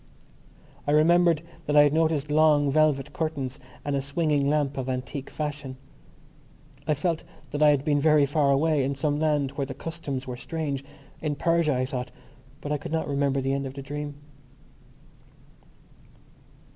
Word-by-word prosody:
I - - +2
remembered 170 +1 +4 0.2
that 145 - +1
I 145 - +9
had 145 0 +3
noticed 155 -2 +1
long 150 -2 +4
velvet 150 -2 +2
curtains 145 -5 -3 0.3
and 145 -1 0
a 135 - 0
swinging 140 0 +1
lamp 145 -2 +1
of 130 -1 -3
antique 130 +2 -4
fashion. 145 -3 -5 1.1
I 150 - +2
felt 165 +2 -1 0.3
that 145 - -3
I 150 - +7
had 145 -1 +2
been 145 -2 +2
very 150 -1 +5
far 145 0 +1
away, 145 +1 +3
in 140 +1 -1
some 145 +1 0
land 150 -3 +1
where 140 -1 -3
the 135 - -6
customs 145 -5 -5
were 125 -1 -6
strange—in 145 0 -5
Persia, 165 -2 +2
I 130 0 0
thought.... 125 -1 -4 0.5
But 145 - -5
I 150 - 0
could 145 - -7
not 160 0 -1
remember 140 -1 +1
the 135 +1 0
end 140 0 -2
of 135 - -9
the 140 - -6
dream. 145 +1 -5
145 Hz, 165 wpm, -26 LUFS, 140-155 Hz, 1.1 s, I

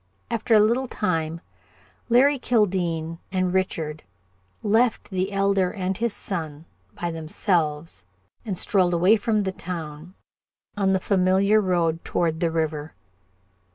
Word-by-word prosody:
After 230 0 +2
a - - +7
little 235 +5 +2
time, 165 -7 -2 0.7
Larry 270 +4 +4
Kildene 175 -9 0
and 185 -1 0
Richard 160 -5 -1 0.6
left 225 +1 +1
the 190 +1 -1
Elder 195 -2 +1
and 190 -1 -2
his 235 +3 -1
son 160 -6 -5 0.3
by 175 -1 -2
themselves 160 - -2 0.4
and 195 -5 -4
strolled 180 -3 +2
away 180 +6 +5
from 215 0 0
the 190 - -1
town 170 -1 -7 0.6
on 195 -2 +2
the 190 - +2
familiar 195 +2 +3
road 170 -4 0
toward 165 -2 -1
the 170 - +1
river. 155 -2 -2
185 Hz, 125 wpm, -24 LUFS, 165-205 Hz, 0.7 s, a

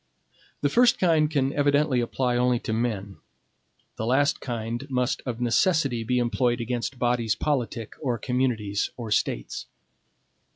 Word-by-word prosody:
The 145 - +2
first 240 - +4
kind 160 -4 +3
can 140 -3 0
evidently 145 -2 +2
apply 125 +1 -1
only 125 0 +2
to 110 - -3
men; 105 -4 -2 0.8
the 110 - -2
last 140 +4 +2
kind 120 +2 -4
must 125 +2 0
of 120 -2 -3
necessity, 125 0 +2
be 125 +3 0
employed 120 0 +1
against 120 +2 -3
bodies 120 -3 +1
politic, 120 -6 -2
or 125 -5 -1
communities, 115 -6 -1
or 115 -3 -6
States. - - -1
125 Hz, 135 wpm, -26 LUFS, 115-140 Hz, 0.8 s, first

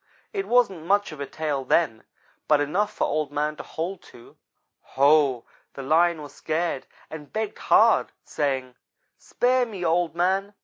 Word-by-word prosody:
It 395 -1 -3
wasn't 195 -10 +2
much 205 0 +2
of 155 - -10
a 140 - -4
tail 150 -3 -3
then, 130 -4 +1 0.4
but 150 -1 +4
enough 180 +9 0
for - - -3
Old 155 -1 -1
man 150 +1 -1
to - - -6
hold 175 +3 -5
to. 120 - -16 0.6
Ho! 140 -3 +4 0.3
The 135 - -6
Lion 165 +2 +2
was 145 - -11
scared 160 -3 -2 0.2
and 150 -2 -9
begged 215 -1 -4
hard, - - +4
saying: 135 -3 -2 0.5
"'Spare 250 0 +1
me, 195 -6 -6
Old 170 0 +1
man. 190 +3 0
160 Hz, 160 wpm, -25 LUFS, 145-195 Hz, 0.6 s, but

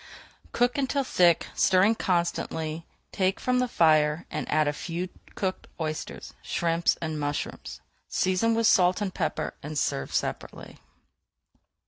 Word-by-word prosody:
Cook 245 +3 +1
until 275 +1 0
thick, 175 -9 +3
stirring 190 +4 +4
constantly, 170 -4 -2 0.2
take 190 0 0
from 250 0 +1
the 250 - +1
fire, 155 -5 +3
and - - -4
add 155 0 +3
a 145 - +1
few 175 +4 -4 0.3
cooked 190 -1 -3
oysters, 155 -1 -5
shrimps, 170 0 0
and 155 -2 -3
mushrooms. 145 0 -4 0.3
Season 185 +5 +1
with 230 0 +1
salt 180 -3 +4
and 200 -3 -2
pepper 155 - -2
and 150 +1 -6
serve 70 - -1
separately. - - -4
175 Hz, 130 wpm, -27 LUFS, 155-200 Hz, 0.3 s, stirring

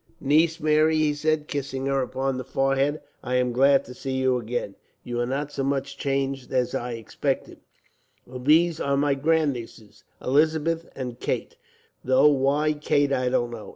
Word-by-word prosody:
"Niece 160 +4 +2
Mary," 155 0 +3
he 155 -1 +2
said, 155 0 -1
kissing 135 -2 -4
her 135 0 +1
upon 135 +1 -2
the - - -4
forehead, 135 +2 0 0.2
"I 125 0 -2
am 125 -1 +2
glad 135 +3 +4
to 125 - -10
see 130 +1 -5
you 130 -1 +1
again. 115 -3 -4 0.3
You 120 -1 -4
are 120 - 0
not 140 +3 -3
so 140 - -3
much 140 0 -2
changed 135 -1 -2
as 125 -2 0
I 120 0 -3
expected. 115 -2 -3 0.7
"And 125 0 -9
these 160 +3 +4
are 140 0 0
my 145 0 +2
grandnieces, 135 -7 -2 0.2
Elizabeth 160 +4 +1
and 125 -2 -6
Kate, - - -3 0.5
though 130 +3 +5
why 145 +2 +2
Kate 145 -1 +1
I 125 -1 +1
don't 120 -1 0
know. 115 -2 -8
135 Hz, 170 wpm, -25 LUFS, 125-150 Hz, 0.7 s, though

